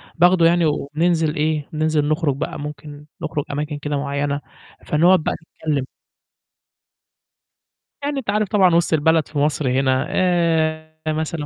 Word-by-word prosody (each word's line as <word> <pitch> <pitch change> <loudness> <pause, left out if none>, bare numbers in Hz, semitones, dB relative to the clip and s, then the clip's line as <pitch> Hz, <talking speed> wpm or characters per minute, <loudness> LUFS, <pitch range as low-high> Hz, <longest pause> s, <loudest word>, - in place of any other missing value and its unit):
باخده 175 0 +4
يعني 170 0 +4
وبننزل 155 +2 0
إيه، 150 -1 -1
بننزل 155 -1 +1
نخرج 155 -3 0
بقى، 140 - -4
ممكن 150 0 -8 0.2
نخرج 155 -2 -2
أماكن 150 +1 -3
كده 145 0 -3
معيّنة، 140 0 -2 0.4
فنقعد 175 +5 +4
بقى - - 0
نتكلم. 155 -4 -4 2.2
يعني 285 -1 -1
أنت 250 - -7
عارف 210 +1 +1
طبعًا 185 -5 +4
وسط 170 -1 +2
البلد 160 0 +3
في 155 - -7
مصر 145 -2 +1
هنا، 130 +1 +1
آآ 165 -4 +1 0.2
مثلًا 155 -1 -3
155 Hz, 135 wpm, -21 LUFS, 145-170 Hz, 2.2 s, باخده